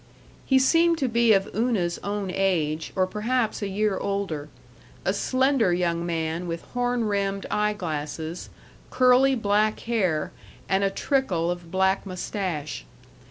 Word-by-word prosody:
He 265 - +5
seemed 330 +5 +4
to 275 - 0
be 235 -1 +3
of 195 -1 +3
Una's 210 -7 0
own 200 -2 -3
age, 160 -5 0
or 185 -1 +3
perhaps 220 +4 -1
a 205 - -1
year 195 0 0
older 190 -7 -3 0.6
a 190 - +2
slender 255 -1 +2
young 170 -1 0
man 165 +1 -2
with 165 0 -4
horn 245 -1 0
rimmed 200 -2 -1
eye 210 0 +1
glasses, 160 -2 -5 0.4
curly 255 +1 +4
black 215 -1 +1
hair, 190 -10 0 0.4
and 195 +1 +1
a 195 - +3
trickle 195 -7 0
of 175 -1 -6
black 190 +2 +1
mustache. 180 - -4
195 Hz, 140 wpm, -25 LUFS, 175-230 Hz, 0.6 s, He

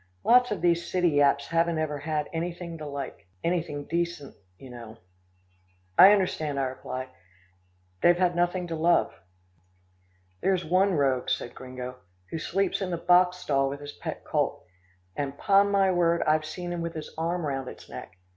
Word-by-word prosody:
Lots 250 +1 +5
of 210 - -3
these 170 0 +2
city 180 -1 +3
yaps 140 -1 +2
haven't 165 0 +1
ever 150 -2 -2
had 150 0 -2
anything 170 +1 -4
to 150 - -6
like 140 -8 -7 0.2
anything 165 -4 -1
decent, 170 -3 -3 0.2
you 130 +5 -12
know." 115 -2 -10 1.0
"I 190 +2 +9
understand," 160 -8 0
I - - +1
replied. 130 0 -5 0.9
"They've 175 0 +5
had 180 -1 +2
nothing 175 +1 0
to 165 - -2
love." 165 +2 +2 1.3
"There's 185 -3 +1
one 185 +4 +3
rogue," 135 -4 +1
said - - -2
Gringo, 125 0 -8 0.3
"who 165 - -3
sleeps 195 +4 -1
in 190 - -2
the 175 - -2
boxstall 180 -5 +3
with 140 +1 -6
his 145 0 -8
pet - - -7
colt, - - -1 0.5
and 140 -1 -3
'pon 200 0 +4
my 195 -1 +3
word, 170 -1 +2
I've 155 0 +2
seen 175 +2 -5
him 175 - -3
with 170 0 -4
his 155 -1 -7
arm 170 +1 -2
round 135 -2 -3
its - - -10
neck. 90 - -10
165 Hz, 165 wpm, -27 LUFS, 140-180 Hz, 1.3 s, I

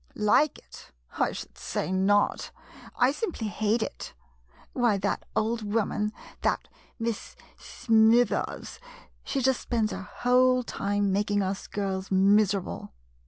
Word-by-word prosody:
Like 215 +8 +3
it? - - -15 0.3
I - - +2
should 60 - -9
say 65 - -3
not 195 +2 +2 0.2
— - - -17
I 260 - +3
sim 350 +5 -3
ply 220 - -4
hate 215 +2 0
it. - - -7 0.6
Why, 240 -5 +2
that 200 +1 -2
old 225 +1 0
woman, 210 0 -1 0.3
that - - 0 0.3
Miss 230 -2 -4 0.2
Smithers 225 0 +1 0.2
— - - -29
she 275 - -2
just 265 -1 +2
spends 225 -3 0
her - - -5
whole 250 +5 +2
time 205 -3 -1
making 205 +1 +1
us 190 +1 -3
girls 195 -1 -3
miserable. 195 - +2
210 Hz, 135 wpm, -27 LUFS, 200-235 Hz, 0.6 s, Like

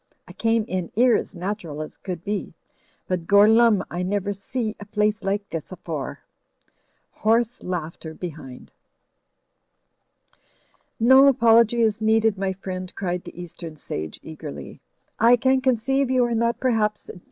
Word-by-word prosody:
I - - -11
came 225 -1 +1
in 185 -2 -3
'ere 245 0 +5
as - - -3
natural 175 -4 -5
as 155 - -6
could 180 -3 -7
be. 205 0 -4 0.5
But 175 -3 -2
Gorlumme, 215 +1 +5
I 175 - -3
never 200 +2 -1
see 220 +3 -4
a 205 - -9
place 210 0 0
like 200 +1 -1
this 165 +1 -5
afore." 165 -6 -6 0.9
(Hoarse 230 +3 +1
laughter 165 -2 -5
behind.) 150 -8 -9 2.3
"No 260 +4 +7
apology 235 -2 +4
is 220 -1 +1
needed, 220 -1 +3
my 195 0 -1
friend," 185 -1 -6
cried 180 -2 -3
the - - -10
East 175 0 -9
em 160 -2 -7
sage, 80 - -6
eagerly, 70 - -9 0.4
"I 235 +2 +6
can 260 +2 +2
conceive 265 +2 +1
you 255 -1 +3
are 240 - -1
not 235 +1 0
perhaps 220 -4 0
u,y,u. - - -10
205 Hz, 145 wpm, -23 LUFS, 180-230 Hz, 2.3 s, No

